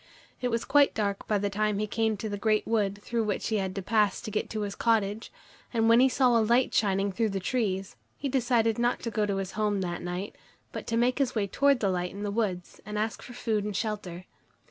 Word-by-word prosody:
It 250 - +1
was 230 -1 -1
quite 285 +1 +4
dark 200 -2 -2
by 210 - +2
the 200 0 -1
time 210 0 0
he 210 - 0
came 220 0 0
to 220 - -4
the 205 - -3
great 215 0 +2
wood 205 -3 0
through 235 -1 -1
which 210 +1 -2
he 220 - +1
had 190 -1 -2
to 195 - -4
pass 210 -1 +2
to 215 - -6
get 210 - -2
to 215 - -3
his 200 -1 -3
cottage, 220 -1 0 0.4
and 225 -2 +2
when 230 +1 +6
he 265 +1 +6
saw 255 -2 +3
a 230 - +5
light 240 +4 +2
shining 195 -1 +2
through 220 +3 0
the 195 -1 -2
trees, 195 -3 -2 0.2
he 280 - -3
decided 240 -4 +1
not 240 +1 +1
to 230 - -3
go 215 -1 0
to 200 - 0
his 195 -1 -3
home 210 -2 0
that 175 -1 -3
night, 180 +3 -4 0.4
but - - -7
to 230 - 0
make 250 +3 +2
his 270 -3 0
way 210 -2 +1
towards 275 +6 +2
the 200 - +2
light 180 0 -1
in 200 +3 -7
the 205 - -2
wood 200 -5 -1 0.2
and 210 +1 -5
ask 215 +1 -2
for 245 - -10
food 220 -4 -1
and 210 -1 -4
shelter. 185 -5 -4
215 Hz, 250 wpm, -28 LUFS, 200-230 Hz, 0.4 s, when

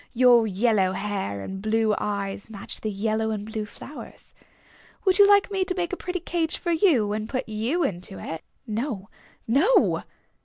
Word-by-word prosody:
"Your 240 -2 +6
yellow 200 -2 +2
hair 190 - -3
and 190 - -6
blue 220 0 +2
eyes 200 0 -3
match 200 -3 -6
the 215 - -2
yellow 220 +2 -1
and 210 -2 -3
blue 215 -1 -4
flowers. 290 +7 -11 0.7
Would 375 0 +3
you 405 - +9
like 405 0 +5
me 385 -1 +1
to 370 0 -3
make 355 -1 -2
a - - +2
pretty 365 0 -4
cage 335 -2 0
for 345 - -2
you 300 - +3
and 215 +1 -3
put 260 -1 -2
you 230 +11 -1
into 190 -5 -4
it?" 160 0 -6 0.2
"No, 220 -3 -3 0.4
no!" 305 - +4
220 Hz, 170 wpm, -25 LUFS, 205-320 Hz, 0.7 s, you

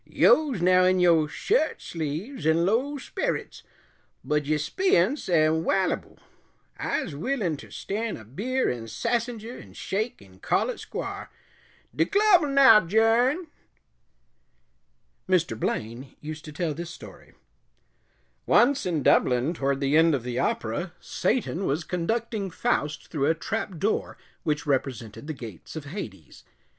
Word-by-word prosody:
Yo's 275 - +3
now 185 0 +5
in 185 0 +3
yo' 165 -3 +4
shirt 355 - 0
sleeves 165 - -4
'n' 165 +2 +3
low 250 +9 +1
sperrets, - - -3 0.6
bud 150 -1 0
de 155 +2 +1
speeyunce 275 - +1
am 160 -1 +3
wallyble. 190 +2 0 0.6
I'se - - -2
willin' 180 - -1
ter - - -12
stan' 220 +2 -4
a 110 - -12
beer 235 - -1
an' 115 -2 -6
sassenger, 235 - -3
'n' - - -15
shake 215 +5 -3
'n' 95 -1 -18
call - - +1
it - - -9
squar'. - - -6 0.7
De - - +3
club 405 -3 +5
'll 300 - 0
now 275 -6 +7
'journ." 225 - +3 1.8
Mr. 170 -10 +2
Blaine 115 +5 -3
used 155 +1 -7
to 155 - -8
tell 160 0 -2
this 170 +3 -6
story: - - -13 1.1
Once 265 -2 +4
in 160 -5 -1
Dublin, 125 +6 +3
toward 140 -4 -1
the 140 +1 +2
end 165 -1 +5
of 130 - -4
the 125 0 -3
opera, 120 +11 -2
Satan 195 -7 -1
was 150 +5 0
conducting 200 +4 -2
Faust 150 -7 -1
through 140 -3 0
a 165 - +3
trap 200 +1 -4
door 210 +7 -1 0.2
which 150 -2 -1
represented 130 -3 -2
the 155 - -3
gates 115 - -10
of 155 -2 -6
Hades. 110 - -8
170 Hz, 140 wpm, -26 LUFS, 145-230 Hz, 1.8 s, now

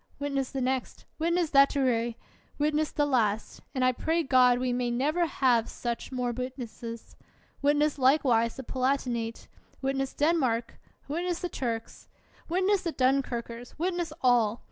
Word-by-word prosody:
Witness 275 -2 -2
the 270 - -3
next! 255 0 -2
Witness 340 0 +1
that 275 -1 +6
to 285 - -2
Rhee! 235 -2 0 0.4
Witness 300 +1 +1
the 295 - +1
last! 225 -6 0
( - - -38
And 255 -1 +2
I 255 - +5
pray 325 +6 0
God 255 -3 +5
we 250 0 -1
may 245 0 0
never 300 +8 +1
have 245 -6 +2
more - - -16
such 235 -1 -4
wit 250 +1 -3
nesses. 230 -2 -8 0.2
) - - -34
Witness 290 +1 +2
likewise 255 -4 +3
the 265 - -7
Palatinate! 250 -3 -2 0.3
Wit 270 0 -1
ness 270 0 -2
Denmark! 265 -7 +1 0.3
Witness 345 +4 -2
the 355 - -2
Turks! 230 -6 -5 0.4
Witness 375 +3 +2
the 335 -4 -3
Dunkirkers! 245 -2 -1
Witness 345 0 -1
all! 240 -3 +3
260 Hz, 160 wpm, -28 LUFS, 240-295 Hz, 0.4 s, that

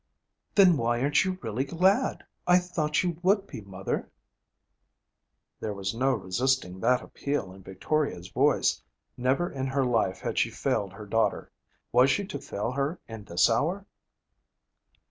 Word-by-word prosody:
'Then 185 -5 +6
why 120 0 0
aren't 140 +3 +3
you 185 0 -2
really 115 +3 -1
glad? 185 - +1 0.2
I 180 0 +7
thought 170 -4 0
you 175 -2 -2
would 195 +2 +3
be, 130 - -8
mother.' 95 -1 -4 1.5
There 105 -2 -4
was 95 0 -3
no 130 +3 +1
resisting 95 -1 -1
that 125 +4 +2
appeal 140 -10 -3
in 95 - -14
Victoria's 95 - -2
voice. - - +2 0.3
Never 130 +8 0
in 135 -1 -3
her 135 0 +1
life 115 -6 +1
had - - -2
she - - +2
failed 100 -3 -1
her 105 +2 -9
daughter. 110 0 0 0.4
Was 125 +3 +5
she 200 +7 +1
to 190 - -6
fail 105 +4 -3
her 140 +6 -2
in 110 -3 -9
this 85 -2 +3
hour? 170 - 0
130 Hz, 150 wpm, -28 LUFS, 105-165 Hz, 1.5 s, I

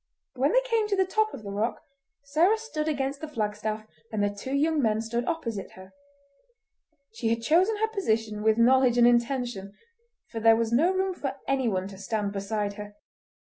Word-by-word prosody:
When 265 +4 +1
they - - +4
came 460 -4 0
to 410 - 0
the 380 -1 +2
top 435 +3 +1
of 235 - -9
the 200 - -6
rock, 210 +4 -1 0.4
Sarah 325 +10 +3
stood 380 -9 -4
against 275 -2 -2
the 315 - -4
flagstaff, 215 -4 -3 0.3
and 215 -2 -1
the 205 0 0
two 260 +7 -4
young 305 +1 +2
men 220 -3 +1
stood 230 +2 -2
opposite 230 - -3
her. 185 0 -14 1.2
She 225 0 -3
had 230 0 -1
chosen 365 - +3
her 440 +1 +1
position 225 - -1
with 220 +1 +3
knowledge 250 +1 +4
and 240 - +6
intention, 240 -4 0 0.6
for 230 - -4
there 225 0 +6
was 230 0 -1
no 310 +10 +4
room 380 0 0
for 275 -6 -5
anyone 230 -9 0
to 195 -1 -11
stand 205 0 -2
beside 200 +1 -3
her. 205 0 -8
240 Hz, 185 wpm, -27 LUFS, 215-310 Hz, 1.2 s, and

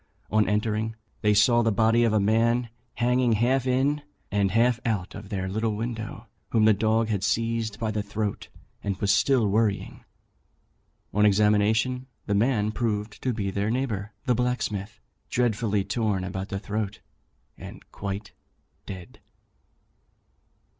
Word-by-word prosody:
On 110 -1 +3
entering 110 +1 0 0.3
they 105 -1 +3
saw 120 +3 +5
the 115 -1 +2
body 115 +3 +3
of 115 - +3
a 110 - +3
man 115 +4 +2 0.3
hanging 125 0 +2
half 125 +4 +2
in 135 +4 +2 0.3
and 100 -1 +2
half 115 +4 +3
out 105 -6 -1
of 105 -1 -9
their 95 -2 -2
little 110 +2 -1
window, 110 0 -5 0.2
whom 110 -2 +3
the 110 - +6
dog 110 +2 +1
had 100 -3 -1
seized 115 -2 0
by 110 -2 -1
the 105 0 -1
throat, 105 0 -3 0.4
and 100 -2 -2
was 100 0 +2
still 130 -6 +3
worrying. 105 0 0 1.1
On 105 - +3
examination, 105 +5 +3 0.2
the 105 - -1
man 105 0 +2
proved 105 -2 -2
to 130 - 0
be 100 -4 -2
their 100 +2 -1
neighbour 110 -4 -2
the 125 - +3
blacksmith, 110 -4 -2 0.3
dreadfully 110 -4 +1
torn 100 -2 -1
about 95 +1 -4
the 95 - -3
throat, 105 0 -3 0.6
and - - -11
quite 100 0 -5 0.6
dead." 90 -3 -9
110 Hz, 145 wpm, -26 LUFS, 105-115 Hz, 1.1 s, the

